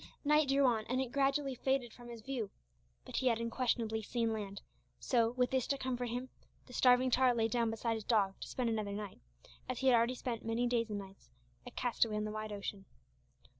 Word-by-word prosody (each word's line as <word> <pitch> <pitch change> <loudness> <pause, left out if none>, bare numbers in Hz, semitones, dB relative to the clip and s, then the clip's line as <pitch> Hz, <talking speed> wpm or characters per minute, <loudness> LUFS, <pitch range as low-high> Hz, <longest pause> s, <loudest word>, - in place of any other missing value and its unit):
Night 300 -1 +4
drew 275 0 +4
on, 230 -4 +3
and 255 +1 +1
it 260 -2 -2
gradually 275 0 +1
faded 255 -2 0
from 240 -1 -12
his 235 -1 -8
view. 240 -5 -3 0.6
But - - -5
he 260 - +2
had 230 -2 +3
unquestionably 230 -1 0
seen 230 +1 -1
land; 200 -2 -5 0.4
so, 230 -3 +2
with 250 0 +1
this 260 -2 +1
to 275 - 0
comfort 250 -2 -2
him, 245 +2 -3 0.4
the 250 - -14
starving 250 +1 +5
tar 250 0 +4
lay 225 -1 +2
down 235 0 +1
beside 225 +1 -1
his 220 -1 -4
dog 205 -4 +2
to - - -6
spend 250 -2 -2
another 215 -2 -2
night 205 -1 -6 0.5
as 255 - -2
he 265 - 0
had 250 - +6
already 235 +2 +3
spent 240 -2 -4
many 225 +2 0
days 235 -2 +1
and 210 - -2
nights 195 -1 -10 0.4
a - - -4
castaway 230 -3 0
on 210 - -1
the 215 - -3
wide 215 0 -4
ocean. 200 -1 -5
235 Hz, 215 wpm, -34 LUFS, 220-255 Hz, 0.6 s, had